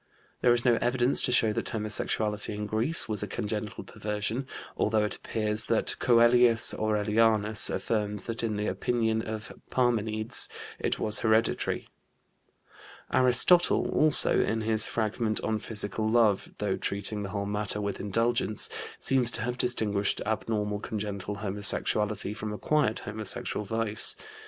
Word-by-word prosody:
There 125 - +4
is 120 +1 +2
no 120 -2 +4
evidence 125 +1 +1
to - - +1
show 110 -3 +3
that - - -3
homosexuality 105 -1 -1
in 105 0 -4
Greece 110 +10 0
was 105 -3 -1
a 105 - -3
congenital 105 +1 -4
perversion, 105 +5 -4 0.3
although 110 0 +1
it 105 - -4
appears 110 -1 -2
that 115 - +2
Coelius 120 -1 +4
Aurelianus 110 0 +2
affirms 105 -3 -2
that 115 -1 -4
in 110 -2 -2
the 105 +1 -2
opinion 110 -1 0
of 110 -1 -6 0.2
Parmenides 110 -3 +1 0.3
it - - -1
was 105 0 0
hereditary. 110 0 0 1.3
Aristotle 130 +8 +4
also, 155 -1 +5
in 110 0 0
his 110 0 +2
fragment 110 0 -1
on 110 -1 -1
physical 110 0 -2
love, 110 -4 +2
though 100 -2 -1
treating 100 +1 -2
the 100 - -5
whole 100 0 -3
matter 105 0 0
with 100 -1 -3
indulgence, 115 +1 0 0.3
seems 130 -3 +1
to 120 - -3
have 125 +1 -2
distinguished 105 -5 0
abnormal 105 -1 -2
congenital 105 -2 -5
homosexuality 105 +1 +1
from 110 0 -5
acquired 110 +2 0
homosexual 105 0 -3
vice. 110 0 -1
110 Hz, 135 wpm, -28 LUFS, 105-115 Hz, 1.3 s, also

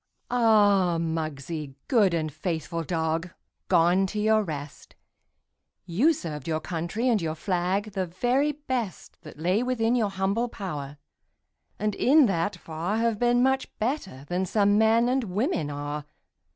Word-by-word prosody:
Ah, 205 -7 +4
Muggsie, 155 -3 -4
good 215 -7 +4
and 155 -3 -2
faithful 165 +1 -3
dog, 165 +1 -1 0.4
Gone 180 +2 +4
to 210 +2 -4
your 215 +1 +3
rest! 150 -6 -7 0.9
You 200 - +3
served 155 - -5
your 160 -1 0
country 170 +9 -3
and 225 -5 +3
your 160 -1 -2
flag 185 +4 -1
The 190 -2 -2
very 245 - +1
best 260 -8 -5
That 150 -3 -12
lay 180 +7 +1
within 245 -2 +1
your 220 -4 +1
humble 195 +5 -1
power, 150 -10 -6 0.8
And 210 0 -1
in 285 +7 +5
that 195 -2 0
far 165 +6 -3
Have 230 -2 0
been 245 0 +3
much 265 0 +1
better 215 - -3
than 180 +1 -1
some 205 +1 +3
men 225 +2 +4
And 255 0 +1
women 200 - -1
are. 145 0 -5
190 Hz, 145 wpm, -26 LUFS, 165-225 Hz, 0.9 s, in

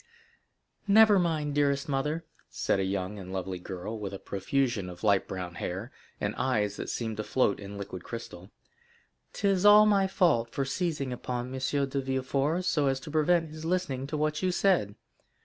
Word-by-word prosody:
"Never 210 0 +7
mind, 155 -4 0
dearest 140 -1 +1
mother," 150 +4 -1 0.2
said - - 0
a - - +1
young 95 +1 -3
and 95 -1 -8
lovely 95 -1 -4
girl, 95 +5 -6
with 100 -2 -5
a - - -5
profusion 100 +1 -1
of 90 +2 -11
light 100 -3 +3
brown 90 -2 -5
hair, 95 +8 -4 0.3
and 100 +1 -1
eyes 105 -6 0
that - - -5
seemed 110 -3 -3
to 110 - -2
float 115 -3 +1
in 100 0 -8
liquid 95 -2 -7
crystal, 105 -5 -8 0.8
"'tis 195 -2 +1
all 210 +1 +8
my 200 -2 +3
fault 160 - +2
for 135 +3 -2
seizing 145 -3 -2
upon 125 +1 -4
M. 130 - -4 0.3
de 135 +1 -2
Villefort, 135 +6 -1
so 150 -5 +2
as 135 0 +1
to 150 - -8
prevent 160 +1 +2
his 155 0 -9
listening 160 -7 -1
to 150 - -3
what 150 0 0
you 185 - +1
said. 175 - +2
130 Hz, 180 wpm, -29 LUFS, 100-160 Hz, 0.8 s, all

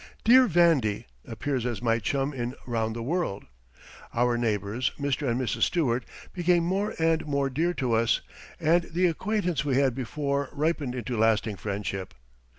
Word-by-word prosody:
"Dear 255 +3 +7
Vandy" 160 - +3 0.2
appears 135 -4 -2
as 120 -2 -2
my 115 -1 +1
chum 140 +5 -1
in 125 -1 -4
"Round 115 -2 -1
the 115 - -4
World." 155 - -2 0.7
Our 120 0 +2
neighbors, 110 +1 -1
Mr. 140 -1 -1
and 120 +2 0
Mrs. 130 - -2
Stewart, 125 -8 +1 0.3
became 175 -1 +2
more 195 +5 -1
and 165 0 +2
more 140 -2 0
dear 170 +6 0
to 125 -4 -1
us, 115 0 +2 0.4
and 170 +2 +3
the 180 +3 0
acquaintance 180 -2 0
we 140 -3 0
had 135 -2 +3
before 140 +2 -2
ripened 145 -3 -1
into 120 -1 -3
lasting 110 -2 +2
friendship. 100 0 -4
135 Hz, 155 wpm, -27 LUFS, 115-165 Hz, 0.7 s, Dear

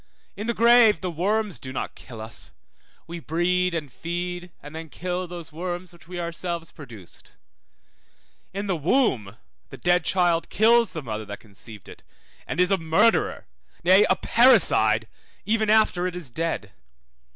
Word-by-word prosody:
In 210 +3 -5
the 235 - -1
grave 235 -2 +5
the 180 -2 -3
worms 195 - -1
do 130 - -7
not 130 - -4
kill 115 -3 -11
us; 110 0 -9 0.6
we 170 +1 -7
breed, 175 +3 0
and 150 -6 -5
feed, 175 +1 -5
and 145 +2 -11
then 160 0 -7
kill 180 +2 -4
those 175 -2 -8
worms 175 +2 -5
which 170 -2 -18
we 180 0 -6
ourselves 170 0 -4
produced. 115 - -13 1.2
In 200 +2 -4
the 195 -3 0
womb 140 - 0 0.3
the - - -10
dead 175 0 +2
child 175 -2 +1
kills 230 +1 +4
the 160 -4 -5
mother 110 -3 -5
that 100 0 -8
conceived 105 -1 -13
it, - - -13 0.5
and - - -4
is 180 +1 +3
a 195 - +2
murderer, 175 +8 +2 0.4
nay, 190 +4 +6
a - - +4
parricide, 250 +3 +4 0.4
even 220 0 +1
after 215 -5 +3
it 180 - -5
is 165 -8 -7
dead. 160 -10 -3
175 Hz, 160 wpm, -24 LUFS, 155-190 Hz, 1.2 s, nay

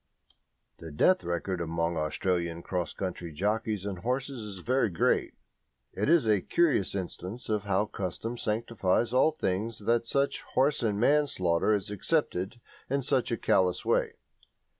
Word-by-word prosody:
The 80 - -8
death 185 - +3
record 85 +1 -2
among 85 +1 -1
Australian 85 +2 -1
cross 90 -2 -2
country 90 -3 -5
jockeys 105 +4 -1
and 100 -3 -4
horses 130 +3 -2
is 100 -3 -7
very 130 -2 +2
great; 85 - +1 0.6
it - - -1
is 170 -6 +5
a 105 -3 +3
curious 150 - +1
instance 95 +4 -5
of 105 -2 0
how 100 +1 +2
custom 105 +4 -4
sanctifies 115 -1 0
all 130 +5 +5
things 110 -5 -2
that 115 0 +2
such 140 +3 0
horse 140 +3 +3
and 105 -3 0
man 145 +5 +4
slaughter 90 -4 +1
is 100 0 -4
accepted 105 - -1 0.3
in 140 +1 0
such 130 -1 +1
a 115 - 0
callous 90 -3 +2
way. - - +1
105 Hz, 150 wpm, -29 LUFS, 90-125 Hz, 0.6 s, is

